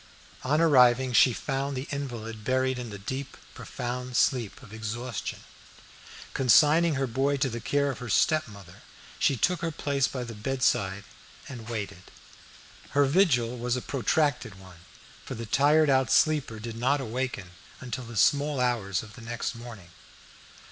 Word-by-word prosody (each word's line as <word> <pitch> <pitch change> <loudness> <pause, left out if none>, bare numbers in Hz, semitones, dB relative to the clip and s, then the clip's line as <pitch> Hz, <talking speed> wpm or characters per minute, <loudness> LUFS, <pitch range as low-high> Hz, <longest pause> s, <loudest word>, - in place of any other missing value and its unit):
On 145 +4 +1
arriving 130 -5 +5
she 125 - +6
found 135 +2 -3
the 130 - -5
invalid 115 -6 -5
buried 130 +2 0
in 120 -2 -6
the 100 - -7
deep, 130 +8 -6 0.2
profound 125 0 -5
sleep 125 -3 0
of 110 -4 -13
exhaustion. 110 +1 -5 0.9
Consigning 150 +5 +4
her 135 0 0
boy 135 +3 0
to 135 0 0
the 115 0 -5
care 140 +4 +1
of 130 - -8
her 125 - -7
stepmother, 100 - 0 0.4
she 135 - +2
took 180 +8 +1
her 165 - -1
place 140 -3 0
by 130 -2 -5
the 115 -1 -7
bedside 105 -4 0 0.4
and 120 -4 -9
waited. 100 -5 -6 0.9
Her 145 - +6
vigil 130 -7 +2
was 120 +1 -1
a - - -3
protracted 125 - 0
one, 95 -3 -14 0.4
for - - -6
the 115 - -6
tired 150 +7 +4
out 130 -1 +2
sleeper 150 -8 +2
did 115 +1 -7
not 135 +5 +1
awaken 120 -6 -4 0.3
until 125 0 -6
the 115 -1 -8
small 145 +4 +3
hours 110 -7 0
of 110 -1 -13
the 120 - -12
next 120 +1 -4
morning. 115 -7 -11
125 Hz, 155 wpm, -27 LUFS, 115-140 Hz, 0.9 s, she